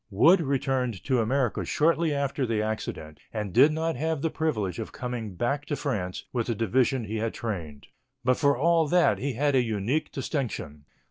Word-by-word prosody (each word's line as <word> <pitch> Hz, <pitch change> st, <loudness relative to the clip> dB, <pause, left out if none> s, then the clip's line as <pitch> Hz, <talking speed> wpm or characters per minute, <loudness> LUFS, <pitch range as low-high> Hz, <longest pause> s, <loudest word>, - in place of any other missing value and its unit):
Wood 165 Hz, -, +5 dB
returned 130 Hz, -, -1 dB
to 130 Hz, -3 st, +1 dB
America 125 Hz, +1 st, 0 dB
shortly 165 Hz, +1 st, +2 dB
after 140 Hz, -2 st, -1 dB
the 115 Hz, -2 st, 0 dB
accident, 105 Hz, -8 st, -4 dB
and 105 Hz, -4 st, -4 dB
did 140 Hz, +6 st, +6 dB
not 160 Hz, +1 st, -1 dB
have 160 Hz, +1 st, -1 dB
the 165 Hz, -, +1 dB
privilege 110 Hz, -, -1 dB
of 110 Hz, -, -5 dB
coming 120 Hz, -5 st, -5 dB
back 140 Hz, +10 st, -1 dB
to 145 Hz, -, -1 dB
France 100 Hz, -12 st, -3 dB
with 120 Hz, -3 st, -1 dB
the 115 Hz, -, 0 dB
division 125 Hz, +3 st, +1 dB
he 110 Hz, +2 st, -3 dB
had 110 Hz, +1 st, -2 dB
trained. 85 Hz, -11 st, -5 dB, 0.4 s
But 130 Hz, 0 st, +3 dB
for 140 Hz, -3 st, +3 dB
all 165 Hz, +2 st, +3 dB
that 175 Hz, +3 st, +3 dB
he 140 Hz, 0 st, -2 dB
had 145 Hz, +4 st, +1 dB
a 130 Hz, -, +4 dB
unique 115 Hz, +7 st, -1 dB
distinction. 110 Hz, -, -4 dB
125 Hz, 185 wpm, -27 LUFS, 110-145 Hz, 0.4 s, did